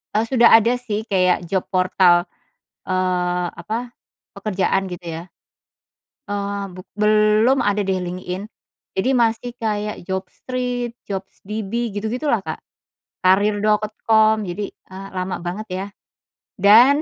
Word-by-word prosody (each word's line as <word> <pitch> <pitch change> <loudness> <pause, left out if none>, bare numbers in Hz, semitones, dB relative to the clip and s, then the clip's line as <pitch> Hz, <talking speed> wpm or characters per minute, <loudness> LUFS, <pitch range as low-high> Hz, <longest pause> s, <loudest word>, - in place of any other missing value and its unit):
eee, 220 - +3
sudah 235 -1 +5
ada 230 +2 +2
sih 215 -3 -3
kayak 185 -4 +2
job 185 +2 -1
portal, 185 -1 +4 0.6
eee, 180 -1 0
apa, 240 +3 -5 0.4
pekerjaan 195 -1 0
gitu 175 0 -8 0.2
ya, - - -10 1.1
eee, 200 0 -2
buk 185 - -11
belum 215 +4 +4
ada 205 0 +1
deh 190 -1 0
LinkedIn, 180 +2 -5 0.5
jadi 190 +7 +1
masih 230 0 +1
kayak 210 -4 -3
Job 190 0 -2
Street, 250 -2 -3 0.2
Jobs 195 -1 -6
DB 220 +2 -3
gitu-gitulah 235 +3 0
Kak, - - -5 0.6
Karir.com 215 +2 +3
jadi, 200 +3 -4
eee, 190 +1 -11
lama 185 0 -2
banget 195 +5 -4
ya, 190 +2 -3 0.7
dan 240 +9 +7
205 Hz, 120 wpm, -21 LUFS, 185-225 Hz, 1.1 s, dan